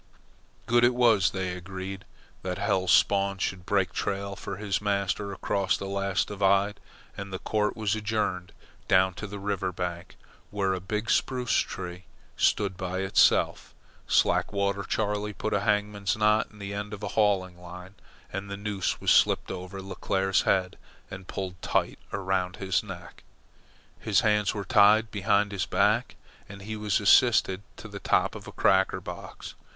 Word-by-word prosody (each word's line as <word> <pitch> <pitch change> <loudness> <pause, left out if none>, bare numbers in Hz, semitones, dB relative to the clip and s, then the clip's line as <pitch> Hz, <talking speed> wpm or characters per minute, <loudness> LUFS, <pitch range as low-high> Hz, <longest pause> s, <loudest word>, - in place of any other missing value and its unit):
Good 120 +1 +3
it 120 0 +4
was, 115 -7 +4
they 95 -1 -3
agreed, 95 +1 -7 0.4
that 90 -1 -3
Hell's 95 -3 +1
Spawn 100 -1 +3
should 95 0 -3
break 95 -3 +1
trail 100 0 -3
for 100 -1 -6
his 100 -1 -2
master 100 0 -1
across 95 0 0
the - - -6
last 100 -1 -1
divide, 100 0 +2 0.4
and 100 0 -7
the 95 - -3
court 105 +2 -1
was 110 -2 0
adjourned 105 -5 -2 0.4
down 95 0 +4
to 100 - -7
the 100 +1 -7
river 100 -2 -2
bank, 90 0 -5 0.3
where 100 -2 0
a 95 - -2
big 105 +6 -3
spruce 125 -2 0
tree 90 -1 -4 0.3
stood 100 -3 +1
by 95 +1 -3
itself. 95 0 +2 0.3
Slackwater 100 0 +1
Charley 105 +1 -2
put 110 - -3
a 100 - +2
hangman's 105 0 0
knot 105 0 +3
in 105 - -18
the 100 -1 -6
end 105 +1 -4
of 105 - -13
a 100 - -2
hauling 95 -4 +1
line, 90 +2 -10 0.4
and 100 +1 -5
the 100 - -5
noose 100 -2 -2
was - - +2
slipped - - +3
over 95 +1 -7
Leclere's 95 0 0
head 95 -1 0 0.3
and 95 -1 -9
pulled 90 -2 -5
tight - - 0
around 95 -1 -1
his 95 -1 0
neck. - - -10 0.8
His - - +2
hands 105 -1 +2
were 100 -2 -4
tied 110 -1 +5
behind 100 0 +1
his 100 -2 -2
back, - - +1 0.3
and 100 0 -10
he 110 +2 -5
was 105 -2 0
assisted 100 -2 +4 0.2
to - - -9
the - - -8
top - - +1
of - - -10
a - - -8
cracker 95 0 +2
box. - - -9
100 Hz, 165 wpm, -27 LUFS, 95-105 Hz, 0.8 s, tied